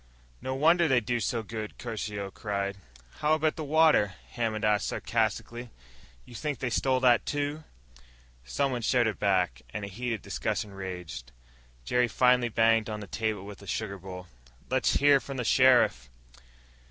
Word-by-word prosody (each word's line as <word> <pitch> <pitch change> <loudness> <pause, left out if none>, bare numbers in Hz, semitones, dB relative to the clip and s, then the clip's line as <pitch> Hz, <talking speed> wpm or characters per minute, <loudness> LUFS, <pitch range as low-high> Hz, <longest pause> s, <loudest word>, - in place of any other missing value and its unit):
"No 130 - -3
wonder 165 +5 +4
they 130 -4 +4
do 120 +1 -2
so 115 0 -1
good!" 110 0 -6
Caruso 105 -4 -5
cried. 100 -1 -3 0.4
"How 150 +1 +3
about 155 0 0
the 160 - -5
water?" 150 - +3 0.2
Hammond 110 -3 -2
asked 105 0 +2
sarcastically. 115 +2 -2 0.6
"You 125 - -14
think 145 +3 -3
they 125 +1 -3
stole 130 +2 +1
that, 125 -2 +5
too?" 145 +2 -3 0.8
Someone 125 - -1
shouted 115 -2 +1
back, 90 -10 +1
and 100 - -5
a - - -7
heated 115 +2 -4
discussion 105 - -3
raged. 90 -10 -7 0.5
Jerry 125 - +2
finally 125 0 +3
banged 115 0 +3
on 105 0 -4
the - - -6
table 110 -2 -3
with 105 -1 -10
a 100 - -13
sugar 100 +1 -3
bowl. 90 0 -8 0.5
"Let's - - +2
hear 145 0 +5
from 135 0 -7
the 125 - -2
sheriff." 125 - +4
115 Hz, 155 wpm, -28 LUFS, 100-130 Hz, 0.8 s, that